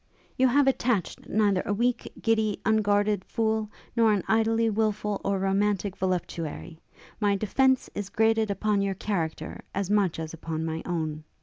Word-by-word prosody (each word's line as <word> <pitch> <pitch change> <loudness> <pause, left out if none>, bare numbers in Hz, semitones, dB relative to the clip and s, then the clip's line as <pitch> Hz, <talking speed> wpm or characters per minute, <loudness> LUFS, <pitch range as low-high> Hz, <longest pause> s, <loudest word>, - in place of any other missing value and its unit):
'You 260 - +4
have 280 +3 +4
attached 245 -7 0
neither 200 -3 +2
a 205 - -1
weak, 240 +2 0
giddy, 220 -2 +1
unguarded 205 -2 +2
fool, 220 -2 -1 0.3
nor 230 -2 +4
an 205 -3 +1
idly 225 +1 +2
wilful 210 -1 0
or 195 0 0
romantic 195 0 0
voluptuary. 170 -3 -3 0.4
My 205 -2 +2
defence 260 +6 +2
is 205 -1 -4
grated 220 0 +2
upon 200 +1 +1
your 195 -1 -1
character 175 -5 -3
as 200 0 -1
much 200 -5 +2
as 160 0 -5
upon 160 0 -4
my 160 0 -3
own. 155 -3 -2
205 Hz, 150 wpm, -27 LUFS, 190-220 Hz, 0.4 s, You